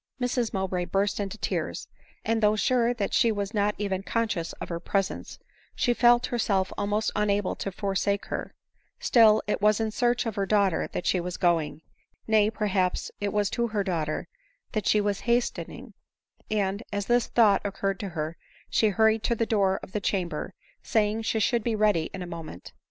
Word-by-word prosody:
Mrs 245 -2 0
Mowbray 190 -3 -1
burst 195 +4 0
into 200 +1 -3
tears; - - -3 0.4
and 225 0 +1
though 210 0 +4
sure 240 +2 +2
that 215 -5 -2
she 235 -3 +4
was 205 0 -3
not 205 -1 +1
even 195 -2 -2
conscious 200 -4 -1
of - - -8
her 170 -1 -3
presence, 195 +3 -2 0.4
she 245 - +2
felt 240 0 +5
her 240 - 0
self 190 -4 +1
almost 210 +2 0
unable 205 -2 +1
to 195 - -3
forsake 200 +1 -1
her; - - -5 0.2
— - - -43
still 220 -3 +6
it 210 - -1
was 210 +1 +4
in 220 -1 -1
search 245 +2 +1
of 225 - -2
her 195 -1 -2
daughter 200 -5 +2
that - - -4
she 185 - +2
was 180 +1 -4
going 165 -3 +1 0.2
— - - -41
nay, 215 -1 +4
perhaps, 195 -4 -1
it 205 -1 -1
was 205 0 +1
to 235 -1 0
her 215 -3 -1
daughter 160 -5 -2 0.4
that 215 -4 -2
she 210 - +4
was 205 -1 0
hastening; 240 +1 -1 0.6
and, 200 -1 0
as 205 -1 -2
this 240 +1 +2
thought 215 -4 +4
occurred 195 -1 -2
to 200 - -4
her, 160 -1 -4 0.3
she 220 - +3
hurried 220 +2 +3
to 235 - 0
the 230 - 0
door 195 -4 +1
of - - -10
the 210 - -2
chamber, 185 -3 -2 0.3
saying 215 0 +1
she 220 0 0
should 230 +1 +1
be 230 -1 0
ready 210 -7 +2
in 190 - -6
a - - -5
moment. 165 - -8
205 Hz, 195 wpm, -27 LUFS, 190-220 Hz, 0.6 s, still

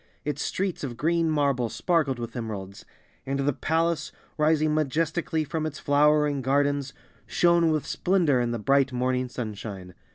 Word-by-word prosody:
Its 150 - -2
streets 190 -4 -2
of 120 -4 -5
green 165 +2 +1
marble 140 -6 +1
sparkled 155 -2 0
with 115 0 -6
emeralds, 100 -5 -6 0.4
and 135 +1 -2
the 140 +1 +1
palace, 165 +2 0 0.2
rising 155 0 +2
majestically 160 +2 0
from 155 +2 -3
its 155 -2 -4
flowering 150 -1 +3
gardens, 140 +1 +1 0.4
shone 170 -1 +3
with 155 -2 0
splendor 175 -8 +2
in 120 - 0
the 120 - -2
bright 135 +4 +2
morning 125 0 -1
sunshine. 105 -6 -6
145 Hz, 150 wpm, -26 LUFS, 125-155 Hz, 0.4 s, flowering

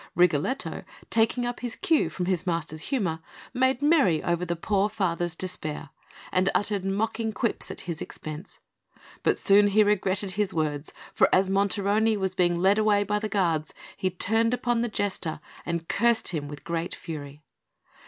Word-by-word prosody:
Rigoletto, 175 - +1 0.3
taking 230 +2 +2
up 245 0 -3
his 245 -2 -4
cue 335 -6 +2
from 180 - -3
his 185 -1 -1
master's 160 -2 -2
humour, 190 - 0 0.3
made 260 +1 +1
merry 280 - +4
over 175 0 0
the 175 -1 -2
poor 200 +4 +1
father's 175 -5 -1
despair, 165 -4 -4 0.4
and 185 +1 +2
uttered 205 -2 0
mocking 220 +3 -1
quips 230 +1 -1
at - - -7
his 170 -3 -5
expense; 155 +4 -7 0.6
but - - +2
soon 205 +1 +5
he 210 +2 +4
regretted 200 -1 0
his 200 -1 -1
words, 150 -2 -1 0.2
for - - +4
as 190 0 +3
Monterone 200 +2 +2
was 190 -1 -1
being 175 -2 +2
led 195 +4 +4
away 210 -1 +3
by 210 +1 0
the 215 0 -3
guards, 170 -6 0 0.2
he 190 -2 -1
turned 225 +6 +2
upon 240 -1 0
the 240 - -1
Jester 200 -7 -2 0.3
and 170 -1 -2
cursed 235 -1 +2
him 150 -5 -3
with 145 0 -9
great 170 +1 -3
fury. 150 -2 -8
195 Hz, 165 wpm, -26 LUFS, 170-215 Hz, 0.6 s, soon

